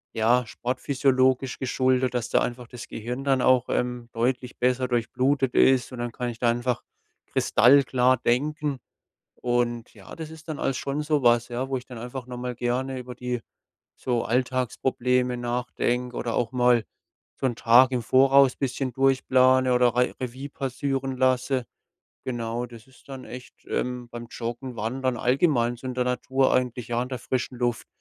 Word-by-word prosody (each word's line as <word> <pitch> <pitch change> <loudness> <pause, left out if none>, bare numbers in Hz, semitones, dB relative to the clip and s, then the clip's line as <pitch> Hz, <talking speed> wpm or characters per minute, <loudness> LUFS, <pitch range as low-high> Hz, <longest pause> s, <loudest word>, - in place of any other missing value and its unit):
ja, 120 +2 +3
sportphysiologisch 130 +1 0
geschuldet, 130 0 +1
dass 120 -1 -2
da - - +3
einfach 120 0 -3
das 120 0 -9
Gehirn 125 +4 -5
dann 135 -2 +2
auch, 130 -1 +3
ähm, 125 -1 -2
deutlich 125 +1 -1
besser 125 +1 +1
durchblutet 130 +2 0
ist 130 -2 +4
und 125 - -8
dann 120 -1 -3
kann 125 0 -3
ich 115 - -7
da 120 - +2
einfach 120 +1 -1 0.4
kristallklar 130 0 +4
denken. 145 +4 0 0.6
Und 120 -1 -1
ja, - - -12
das 160 -2 -7
ist 160 0 -13
dann 155 - -4
alles 135 - 0
schon 140 +4 -2
so 150 -2 0
was, 120 0 +4
ja, 125 +2 -3
wo 135 - -1
ich 125 - -7
dann 125 -3 -9
einfach 125 +2 -7
noch 125 -1 -7
mal 125 0 -4
gerne 130 +2 -2
über 125 0 -8
die 125 0 -3 0.5
so 120 -2 -1
Alltagsprobleme 125 0 0
nachdenke 120 0 -2
oder 115 -2 -2
auch 120 - 0
mal 125 -2 +3 0.5
so 135 - 0
'n 120 - 0
Tag 125 +3 +5
im 125 -2 0
Voraus 135 +3 +5
bisschen 130 -1 -2
durchplane 130 -1 +3
oder 125 -1 +3
Re 125 0 +1
Revue 130 +3 -5
passieren 135 0 -3
lasse. 130 0 +1 0.6
Genau, 120 -1 -3
das 115 -1 -14
ist 130 +1 -22
dann 135 -1 -8
echt, 125 0 -10
ähm, 125 -1 -3
beim 120 0 -7
Joggen, 120 +2 -5
Wandern, 125 +3 -2
allgemein 125 -1 +2
so 130 - -10
in 130 - -3
der 125 - 0
Natur, 130 +2 +1
eigentlich 125 -2 -1
ja 120 0 0
an 125 - -3
der 130 - -3
frischen 125 +1 -3
Luft. 120 -2 -1
125 Hz, 170 wpm, -25 LUFS, 120-130 Hz, 0.6 s, Tag